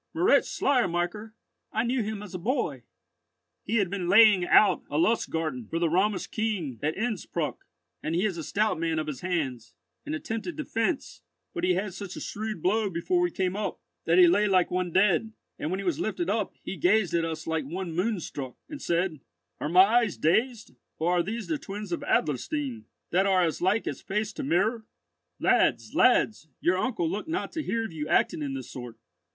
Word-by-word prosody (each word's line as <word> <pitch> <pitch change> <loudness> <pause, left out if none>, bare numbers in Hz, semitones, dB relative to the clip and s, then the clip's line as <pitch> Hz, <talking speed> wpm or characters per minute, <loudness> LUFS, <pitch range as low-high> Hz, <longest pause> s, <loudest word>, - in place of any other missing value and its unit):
"Moritz 365 +8 +4
Schleiermacher! 210 -3 0 0.4
I 220 - 0
knew 245 +1 0
him 215 -1 -4
as 205 - -10
a 185 - -4
boy." 170 - -2 0.8
"He 225 - -3
had 200 -5 +2
been 185 -3 -2
laying 205 -2 +7
out 185 0 +5
a 145 - -2
Lustgarten 160 - 0
for 165 - -3
the 165 -1 +1
Romish 190 +3 +1
king 190 - -3
at 155 +2 -1
Innspruck, 220 -2 -3 0.3
and 160 - -2
he 180 +4 +2
is 200 -5 0
a 165 - -5
stout 210 +1 0
man 165 -1 0
of 155 - -1
his 150 -4 -5
hands, 145 -10 -3 0.3
and 300 +2 -3
attempted 230 +1 -4
defence; 275 0 -2 0.3
but 345 - -4
he 365 0 +3
had 200 -3 -2
such 190 0 -7
a - - -6
shrewd 215 -5 -5
blow 210 +3 +2
before 190 - 0
we 355 - +2
came 190 - -1
up, 210 0 -3 0.3
that - - +3
he 365 - +9
lay 210 -12 +4
like 185 -3 +3
one 180 -1 -1
dead; 210 +4 +2 0.3
and 155 - -2
when 185 +2 -2
he - - -4
was 175 -5 0
lifted 190 -3 -1
up, 215 -2 -1
he 195 - -5
gazed 185 +3 +3
at 170 -1 +2
us 160 -1 -4
like 160 -3 -1
one 175 +4 -4
moon 195 +4 0
struck, 135 -5 -6
and 295 -2 -8
said, 170 -3 -1 0.4
'Are 150 - -2
my 180 +3 +8
eyes 225 -1 +2
dazed, 220 +8 +1 0.2
or 165 +2 +1
are - - +4
these 215 +6 -4
the 310 -2 -2
twins 205 -3 -7
of 170 - -2
Adlerstein, 235 - -1 0.3
that 190 +3 +3
are 185 -2 +4
as 165 -2 -1
like 190 +5 +2
as - - -4
face 210 +2 -2
to - - -5
mirror? 195 - +1 0.6
Lads, - - +2
lads, 215 -7 +3
your 185 +2 +2
uncle 220 -9 0
looked 205 - -4
not 330 - -2
to 320 - -3
hear 230 -6 -1
of 195 - -8
you 150 -1 -4
acting - - +2
in 140 -2 -3
this 130 -2 -7
sort. 120 -3 -8
190 Hz, 200 wpm, -27 LUFS, 165-220 Hz, 0.8 s, he